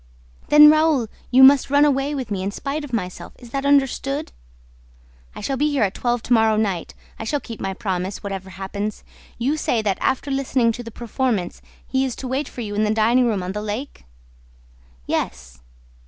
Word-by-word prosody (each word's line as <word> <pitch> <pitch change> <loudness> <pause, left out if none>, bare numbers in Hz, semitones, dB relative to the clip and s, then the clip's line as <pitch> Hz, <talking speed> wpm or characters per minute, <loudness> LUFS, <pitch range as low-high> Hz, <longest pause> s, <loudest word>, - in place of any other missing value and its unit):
"Then, 300 0 +9
Raoul, 310 -7 +2 0.2
you 260 +1 +6
must 275 0 +7
run 285 +1 +5
away 280 0 +1
with 255 -5 -5
me 195 -2 -2
in 195 - -2
spite 280 +8 -4
of 290 - -8
myself; 185 -6 -4
is 240 -2 -14
that 275 +1 -2
understood?" 280 +1 +1 1.0
"I - - -7
shall 270 +6 -2
be 295 +3 +2
here 285 -5 +1
at 195 -1 0
twelve 240 -1 -1
to 245 - +1
morrow 220 -1 +4
night; 195 -6 -2 0.2
I - - -4
shall 290 +6 -1
keep 230 -5 -9
my 190 0 -3
promise, 190 -1 -3
whatever 195 -2 -5
happens. 195 +2 -5 0.3
You 270 +6 0
say 235 -6 0
that, 195 -3 0
after 265 +2 0
listening 260 -3 +1
to 245 - -6
the 230 - -8
performance, 230 -4 -2 0.2
he 265 0 0
is 260 -3 -2
to 260 - -6
wait 265 +4 -2
for 245 - -8
you 210 -2 -5
in 210 +1 +1
the 210 - +1
dining 230 +3 +3
room 205 -5 -1
on 180 - -4
the 210 +2 -4
lake?" 215 - -6 1.0
"Yes." 65 +1 -4
240 Hz, 200 wpm, -22 LUFS, 205-275 Hz, 1.0 s, Then